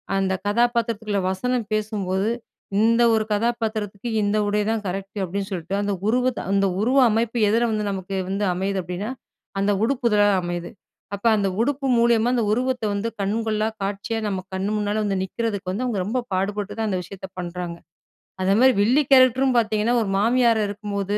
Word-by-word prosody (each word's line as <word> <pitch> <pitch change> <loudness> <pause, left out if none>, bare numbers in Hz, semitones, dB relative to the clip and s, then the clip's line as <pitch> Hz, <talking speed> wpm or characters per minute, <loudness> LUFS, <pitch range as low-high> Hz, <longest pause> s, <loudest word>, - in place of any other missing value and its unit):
அந்த 195 -1 +1
கதாபாத்திரத்துக்குள்ள 230 -2 +1
வசனம் 240 +2 -2
பேசும்போது 205 -2 -1 0.5
இந்த 230 +2 +4
1 220 -1 +2
கதாபாத்திரத்துக்கு 220 -1 -1
இந்த 205 +1 +1
உடைதான் 210 +1 0
கரெக்ட் 195 +2 -5
அப்டின்னு 195 +2 -3
சொல்ட்டு, 180 0 -4
அந்த 205 0 -1
உருவத்த 250 +1 +1
அந்த 200 0 +3
உருவ 250 +6 +2
அமைப்பு 230 +2 0
எதில 230 +3 +2
வந்து 215 -1 -1
நமக்கு 195 0 -5
வந்து 200 +2 -1
அமையுது 190 +2 -1
அப்டின்னா 180 +5 -5 0.5
அந்த 200 +1 +2
உடுப்புதான் 225 -5 +3
அமையுது. 175 0 -4 0.5
அப்ப 200 - -12
அந்த 200 -1 +1
உடுப்பு 275 +2 -1
மூலியமா 235 0 +3
அந்த 235 -3 +1
உருவத்த 250 +1 0
வந்து 210 +3 -2
கண் 200 +2 0
கொள்ளா 215 0 0 0.2
காட்சியா 200 +3 -3
நம்ம 195 -2 -2
கண்ணு 190 +2 -1
முன்னால 210 +1 -1
வந்து 195 -1 0
நிக்குறதுக்கு 200 -2 -3
வந்து 220 +7 -2
அவங்க 220 -6 -1
ரொம்ப 245 +5 -1
பாடுபட்டு 205 +2 -2
தான் 220 -1 -1
அந்த 185 - 0
விஷயத்த 190 +2 -9
பண்றாங்க. 175 -1 -5 0.6
அதே 195 +2 +3
மாரி 260 0 +6
வில்லி 255 +8 +4
கேரக்டரும் 260 0 +5
பார்த்தீங்கன்னா, 220 +1 +1
1 205 - -2
மாமியார் 235 0 +3
இருக்கும்போது 205 0 -3
210 Hz, 160 wpm, -23 LUFS, 195-230 Hz, 0.6 s, மாரி